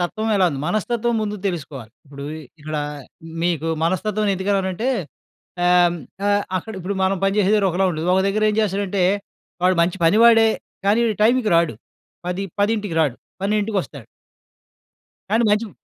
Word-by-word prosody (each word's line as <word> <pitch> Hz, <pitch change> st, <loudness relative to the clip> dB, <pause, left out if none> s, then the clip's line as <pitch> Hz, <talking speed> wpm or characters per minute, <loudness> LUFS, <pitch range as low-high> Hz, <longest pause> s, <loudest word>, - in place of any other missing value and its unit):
తత్వం 215 Hz, +5 st, -2 dB
ఎలా 185 Hz, -2 st, +4 dB
ఉంది, 135 Hz, -2 st, -5 dB
మనస్తత్వం 230 Hz, +5 st, 0 dB
ముందు 210 Hz, 0 st, -3 dB
తెలుసుకోవాలి. 140 Hz, -, -5 dB
ఇప్పుడు 140 Hz, 0 st, -9 dB, 0.4 s
ఇక్కడ 155 Hz, +1 st, -4 dB, 0.7 s
మీకు 165 Hz, -2 st, 0 dB, 0.2 s
మనస్తత్వం 210 Hz, +4 st, 0 dB
ఎందుకన్నానంటే, 190 Hz, +3 st, -1 dB, 0.8 s
ఆహ్, 175 Hz, -1 st, +4 dB, 0.3 s
ఆహ్, 205 Hz, 0 st, +2 dB, 0.2 s
అక్కడ 220 Hz, +5 st, -8 dB
ఇప్పుడు 190 Hz, +2 st, -3 dB
మనం 190 Hz, +1 st, +1 dB
పని 195 Hz, +1 st, +1 dB
చేసే 200 Hz, -1 st, +3 dB
దగ్గర 200 Hz, -2 st, +3 dB
ఒకలా 190 Hz, +2 st, +2 dB
ఉండదు. 160 Hz, +2 st, -3 dB
ఒక 190 Hz, -, +3 dB
దగ్గరేం 215 Hz, +1 st, +1 dB
చేస్తాడంటే, 200 Hz, -2 st, 0 dB, 0.6 s
వాడు 185 Hz, 0 st, +4 dB
మంచి 175 Hz, +2 st, 0 dB
పనివాడే. 225 Hz, +3 st, +6 dB, 0.4 s
కానీ, 210 Hz, +3 st, +4 dB, 0.2 s
టైం‌కి 240 Hz, -1 st, +3 dB
రాడు. 165 Hz, -7 st, +2 dB, 0.5 s
పది 180 Hz, +2 st, -2 dB, 0.2 s
పదింటికి 205 Hz, -3 st, 0 dB
రాడు 145 Hz, -6 st, +1 dB, 0.3 s
12కి 210 Hz, +2 st, 0 dB
వస్తాడు. 140 Hz, -9 st, -11 dB, 1.3 s
కానీ 225 Hz, +3 st, +3 dB
మంచి 210 Hz, +2 st, +1 dB
195 Hz, 140 wpm, -21 LUFS, 175-215 Hz, 1.3 s, పనివాడే